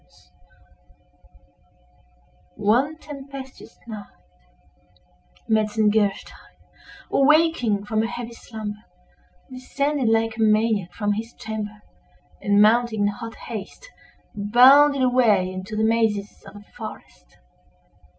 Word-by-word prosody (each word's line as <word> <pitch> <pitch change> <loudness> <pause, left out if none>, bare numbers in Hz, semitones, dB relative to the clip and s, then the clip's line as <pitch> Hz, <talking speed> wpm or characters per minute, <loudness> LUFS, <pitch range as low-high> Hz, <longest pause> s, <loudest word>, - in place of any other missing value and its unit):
One 250 +10 +1
tempestuous 275 -3 -11
night, 215 -3 -8 1.4
Metzengerstein, 215 -2 0 0.6
awaking 275 -8 +3
from 220 +1 0
a 225 - -1
heavy 235 0 -7
slumber, 215 -2 -8 0.7
descended 275 0 -1
like 225 0 +1
a - - -3
maniac 215 -4 +2
from 205 +1 -1
his 225 +3 -6
chamber, 210 -1 -7 0.6
and, 205 0 +2
mounting 220 +1 +3
in 205 - +3
hot 230 +2 -7
haste, 230 - -9 0.4
bounded 260 +7 +5
away 225 -7 +3
into 185 +4 -7
the 215 - 0
mazes 220 -3 0
of 195 - -13
the 205 0 -15
forest. - - -11
220 Hz, 95 wpm, -23 LUFS, 210-250 Hz, 1.4 s, bounded